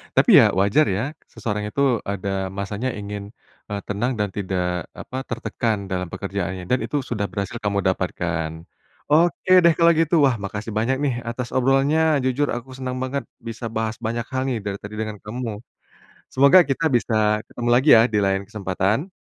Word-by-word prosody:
Tapi - - +4
ya - - +7
wajar 100 +11 +3
ya, 95 +3 0 0.3
seseorang 105 -2 -3
itu 140 - -2 0.2
ada 100 0 -3 0.3
masanya 100 +5 -3
ingin, 100 0 -6 0.4
eee, 100 -1 -3
tenang 110 +5 -1
dan 105 -1 0
tidak, 90 -3 -2
apa, 130 - -8
tertekan 115 -3 -1
dalam 90 -1 -2
pekerjaannya. 95 -2 -4
Dan 125 - +2
itu 145 - -1
sudah 115 -5 -3
berhasil 100 +2 -4
kamu 100 -1 0
dapatkan. 85 -3 -2 0.6
Oke 170 +3 +3
deh 170 - +7
kalau 170 0 +6
gitu, 165 +1 +2
wah 125 - +1
makasih 105 +2 -5
banyak 115 +5 +1
nih 140 -3 +1
atas 120 +1 -4
obrolannya. 140 +4 +3
Jujur 135 +3 +1
aku 120 +2 -5
senang 130 -1 -4
banget 135 +2 -2 0.2
bisa 115 +1 -7
bahas 110 0 -1
banyak 115 +1 -2
hal 130 -1 -1
nih 125 - -1
dari 100 -1 -3
tadi 105 +1 -7
dengan 110 -1 -3
kamu. 110 -1 -5 0.7
Semoga 140 +7 +7
kita 145 +2 -1
bisa 120 -1 0 0.3
ketemu 120 0 -4
lagi 130 +5 +3
ya 110 - +7
di - - +3
lain 95 0 0
kesempatan. 105 - -1
110 Hz, 170 wpm, -22 LUFS, 100-130 Hz, 0.7 s, ya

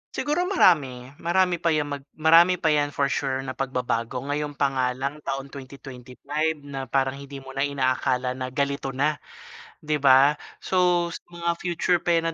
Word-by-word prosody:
Siguro 345 +5 0
marami. 135 - +2
Marami 175 0 +1
pa 170 - -1
'yang 145 -1 -1
mag 140 - -3 0.2
marami 165 +3 +6
pa 165 -3 +1
'yan 145 -1 +2
for 140 -1 +1
sure 135 -1 -1
na 130 - -4
pagbabago. 125 -2 -2
Ngayon 145 +1 -3
pa 140 -1 +1
nga 130 -1 0
lang 140 +3 -4
taon 135 -1 -5
2025 140 +3 -5
na 135 -2 -6
parang 135 0 0
hindi 140 -1 -9
mo 135 - -10
na 135 +1 0
inaakala 130 -2 0
na 130 0 -4
ganito 140 0 -2
na, 150 +2 0 0.7
'di 150 -1 -1
ba? 135 +1 +6 0.2
So, 175 -2 +1
sa - - -8
mga 170 0 -3
future 175 0 0
pa 170 -1 +2
'yan 165 0 -1
140 Hz, 175 wpm, -25 LUFS, 135-165 Hz, 0.7 s, marami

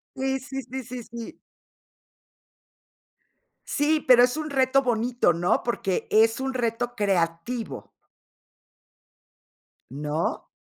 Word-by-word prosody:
Sí, 265 0 -1
sí, 270 +1 -6
sí, 260 +1 -6
sí, 245 0 -7
sí. 235 0 -9 2.2
Sí, 300 +1 +1
pero 245 -1 +8
es 250 +4 +2
un 310 -1 -3
reto 270 0 +3
bonito, 240 -5 +1
¿no? 175 +5 +1
Porque 195 -6 -2
es 225 +3 +4
un 265 0 -2
reto 240 0 -2
creativo. 195 +3 -2 2.0
¿No? 150 +4 -3
240 Hz, 100 wpm, -25 LUFS, 210-265 Hz, 2.2 s, pero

